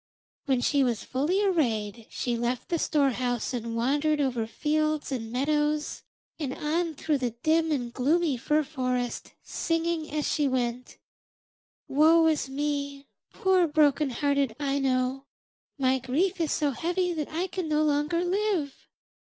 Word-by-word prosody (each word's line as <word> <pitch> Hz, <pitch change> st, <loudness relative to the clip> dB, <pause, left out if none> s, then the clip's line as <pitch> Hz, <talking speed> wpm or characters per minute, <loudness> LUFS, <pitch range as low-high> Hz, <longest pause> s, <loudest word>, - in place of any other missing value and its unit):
When 265 Hz, -4 st, +1 dB
she 280 Hz, +2 st, +2 dB
was 240 Hz, -4 st, -1 dB
fully 315 Hz, +10 st, 0 dB
arrayed 230 Hz, -, 0 dB
she 245 Hz, -2 st, -2 dB
left 240 Hz, +5 st, -2 dB
the 340 Hz, -2 st, 0 dB
storehouse 255 Hz, -4 st, 0 dB
and 230 Hz, -1 st, -3 dB
wandered 290 Hz, +6 st, +1 dB
over 250 Hz, -5 st, 0 dB
fields 305 Hz, +3 st, -1 dB
and 225 Hz, -4 st, -4 dB
meadows 295 Hz, +3 st, 0 dB, 0.4 s
and 270 Hz, -4 st, -3 dB
on 320 Hz, +2 st, -1 dB
through 295 Hz, 0 st, 0 dB
the 245 Hz, -3 st, -2 dB
dim 320 Hz, 0 st, +3 dB
and 245 Hz, -5 st, -2 dB
gloomy 300 Hz, +4 st, +2 dB
fir 300 Hz, +5 st, +1 dB
forest, 255 Hz, -4 st, -3 dB
singing 330 Hz, -1 st, -1 dB
as 300 Hz, 0 st, -1 dB
she 295 Hz, -3 st, +1 dB
went: 250 Hz, -1 st, -2 dB, 0.9 s
'Woe 320 Hz, +4 st, +5 dB
is 310 Hz, -4 st, +1 dB
me, 280 Hz, 0 st, -3 dB, 0.2 s
poor 375 Hz, -2 st, +3 dB
broken 295 Hz, -1 st, +3 dB
hearted 280 Hz, -2 st, 0 dB
Aino! 270 Hz, -1 st, 0 dB, 0.5 s
My 265 Hz, -1 st, +2 dB
grief 340 Hz, +9 st, 0 dB
is 320 Hz, -, 0 dB
so 295 Hz, -2 st, +1 dB
heavy 355 Hz, +6 st, -1 dB
that 305 Hz, -3 st, -3 dB
I 335 Hz, +4 st, -1 dB
can 370 Hz, -3 st, -4 dB
no 305 Hz, 0 st, +2 dB
longer 300 Hz, +3 st, +1 dB
live. 370 Hz, -6 st, -1 dB
290 Hz, 145 wpm, -27 LUFS, 255-315 Hz, 0.9 s, Woe